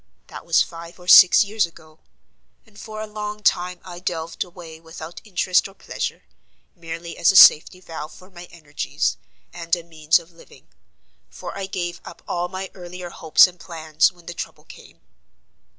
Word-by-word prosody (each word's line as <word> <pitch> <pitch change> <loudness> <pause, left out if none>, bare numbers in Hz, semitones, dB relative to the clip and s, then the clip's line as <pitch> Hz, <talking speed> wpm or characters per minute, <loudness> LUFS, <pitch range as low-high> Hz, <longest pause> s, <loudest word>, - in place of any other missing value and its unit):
That - - -10
was 165 - +4
five 170 +1 -11
or 180 - -15
six 185 +4 +9
years 205 -2 0
ago: 155 -1 -19 0.7
and 210 -2 -18
for 215 -1 -8
a - - -4
long 210 0 -6
time 180 -2 +1
I 175 -2 -9
delved 165 -2 -4
away 170 -3 -12
without 160 0 -10
interest 185 -3 +1
or 195 - -17
pleasure, - - -5 0.5
merely 170 0 -8
as 170 - +5
a - - -5
safety 180 0 +7
valve 160 -4 -8
for 185 +2 -16
my 175 -1 -11
energies, 155 -4 -3 0.4
and 170 0 -1
a 170 - -9
means 160 -1 +2
of 170 0 -12
living; 170 - -19 0.6
for - - -9
I 195 -1 -5
gave 175 -2 -4
up - - -12
all 175 0 -2
my 190 +1 -7
earlier 180 -1 -9
hopes 160 -2 +5
and 180 -1 -7
plans 160 0 0
when 175 -2 -21
the 175 - -7
trouble - - -8
came. - - -16
175 Hz, 175 wpm, -22 LUFS, 165-185 Hz, 0.7 s, six